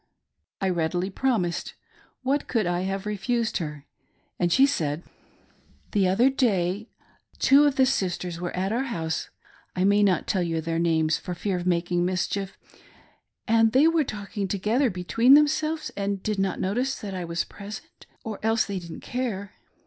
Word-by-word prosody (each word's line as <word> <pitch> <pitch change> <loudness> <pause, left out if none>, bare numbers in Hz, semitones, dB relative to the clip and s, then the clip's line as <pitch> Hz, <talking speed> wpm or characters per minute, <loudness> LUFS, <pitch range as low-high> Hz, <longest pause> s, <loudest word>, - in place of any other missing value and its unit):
I 190 - 0
readily 175 +2 -1
promised 190 -8 -1 0.2
— - - -32
what 275 +3 0
could 225 -5 0
I 175 0 0
have 195 +1 -3
refused 220 +3 -1
her? 150 -4 -6 0.3
— - - -43
and 175 -1 +1
she 265 +9 +6
said: 160 - -1 0.5
" - - -34
The 200 -3 +2
other 195 +8 +4
day 205 -5 0 0.5
two 280 +2 +6
of 285 -2 +2
the 265 - +5
Sisters 180 -8 -1
were 175 - -2
at 190 +2 -1
our 245 +4 0
house 160 -10 -3 0.2
— - - -31
I 180 - +1
may 200 +1 +4
not 195 -4 +2
tell 190 - 0
you 165 -2 -1
their 165 +1 -2
names 160 -2 +2
for 180 - -5
fear 190 +2 -2
of 180 0 -3
making 175 0 +1
mischief 185 +2 -2 0.5
— - - -37
and 225 0 +4
they 275 +5 +6
were 330 -1 +3
talking 205 -4 -4
together 215 +8 +1
between 230 +8 +4
themselves 305 +1 +2
and 200 -1 -2
did 215 -2 -1
not 195 -1 0
notice 250 +8 -1
that 200 -2 -6
I 185 -1 -4
was 170 0 -2
present 205 +1 -11
— - - -38
or 220 -2 -5
else 225 +1 +2
they 200 -2 -3
didn't 170 -2 -9
care. 215 -6 -3
195 Hz, 185 wpm, -26 LUFS, 175-235 Hz, 0.5 s, she